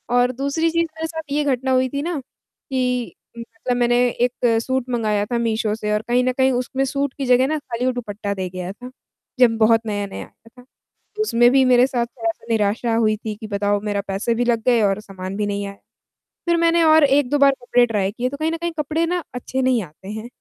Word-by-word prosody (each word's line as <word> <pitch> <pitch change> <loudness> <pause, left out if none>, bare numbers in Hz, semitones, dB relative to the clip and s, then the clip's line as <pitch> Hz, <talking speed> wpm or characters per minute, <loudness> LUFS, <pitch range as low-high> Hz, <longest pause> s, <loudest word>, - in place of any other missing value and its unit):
और 245 0 +3
दूसरी 280 +6 -1
चीज़ 335 0 +1
मेरे 320 0 -2
साथ 320 0 -5
ये 295 +1 +1
घटना 265 -2 0
हुई 260 0 +2
थी 280 +2 -3
ना 335 0 -2
कि, 250 -1 -4 0.2
मतलब 235 +1 -4
मैंने 240 0 +2
1 240 -1 +1
सूट 260 0 -1
मँगाया 215 -4 0
था 235 +3 -2
मीशो 225 -2 0
से 210 -1 -3
और 210 - +1
कहीं 245 +1 +2
न 255 - +1
कहीं 265 +1 +2
उसमें 255 +2 -1
सूट 275 0 -2
की 275 - -2
जगह 250 +1 +4
ना 310 +2 0
खाली 245 -3 -4
वो 255 - +2
दुपट्टा 210 -4 -4
दे 190 -2 -4
गया 180 0 -5
था, 250 +5 -11 0.5
जब 235 -3 +5
बहुत 225 0 +4
नया-नया 205 -2 -4
आया 230 - -22
था - - -21 0.6
उसमें 240 - +4
भी 265 +1 +4
मेरे 250 0 +5
साथ 245 -3 -1
थोड़ा-सा 225 -2 -5
निराशा 225 +2 +1
हुई 220 -1 +2
थी 215 0 -5
कि 215 +1 -8
बताओ 205 0 0
मेरा 205 -1 -1
पैसे 195 +4 -1
भी 240 +2 0
लग 235 -2 +1
गए 240 -2 +4
और 200 0 +1
सामान 190 -2 -7
भी 210 0 -1
नहीं 200 0 -2
आया। 200 - -7 0.7
फिर 340 - +4
मैंने 335 0 +3
और 315 -1 +6
1-2 285 0 +2
बार 280 0 +6
कपड़े 245 0 +3
ट्राय 205 -4 0
किए 240 +3 -2
तो 280 - -6
कहीं 310 +2 -1
न - - -1
कहीं 340 +1 -3
कपड़े 305 +3 0
ना 355 +1 -1
अच्छे 260 +1 -3
नहीं 255 -3 +2
आते 170 +4 -14
हैं। 220 +1 -6
245 Hz, 225 wpm, -21 LUFS, 215-265 Hz, 0.7 s, और